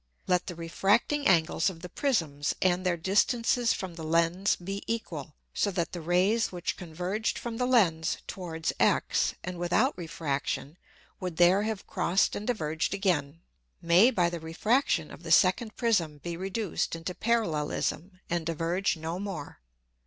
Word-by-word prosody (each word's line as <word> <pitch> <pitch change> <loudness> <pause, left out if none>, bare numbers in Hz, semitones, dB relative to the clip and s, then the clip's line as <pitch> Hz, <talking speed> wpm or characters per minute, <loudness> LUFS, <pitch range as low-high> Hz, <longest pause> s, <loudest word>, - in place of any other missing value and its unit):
Let 180 -1 +1
the 180 - -5
refracting 205 - +1
Angles 165 0 +3
of 165 -3 -10
the 180 - -6
Prisms, 165 - -1
and 185 0 +2
their 180 -2 +1
distances 230 +6 +2
from 185 -2 -3
the 165 -1 -8
Lens 170 +4 +2
be 195 +3 -5
equal, 165 -10 -5 0.2
so 205 - +1
that 180 -4 -2
the 175 - -5
Rays 185 +7 +2
which 180 -1 -3
converged 180 +5 -3
from 235 -1 -5
the 250 0 0
Lens 170 -11 +3
towards 165 -4 -4
X, - - +2
and 180 -1 -5
without 210 +10 +2
Refraction, 155 -2 -3 0.4
would 180 -3 -5
there 175 +3 +5
have 215 -1 -3
crossed 185 +3 +1
and 210 - -5
diverged 160 -7 -1
again, 165 -6 0 0.4
may 175 +8 +5
by 180 -9 +2
the 170 0 -4
Refraction 165 - 0
of - - -11
the 165 -2 -6
second 195 +6 +4
Prism 180 -11 +1
be 170 +3 -5
reduced 190 0 -2
into 165 +2 -5
Parallelism 180 -3 -1
and 170 -1 -1
diverge 170 +3 -1
no 165 +3 -4
more. 190 - -6
180 Hz, 155 wpm, -28 LUFS, 165-205 Hz, 0.4 s, there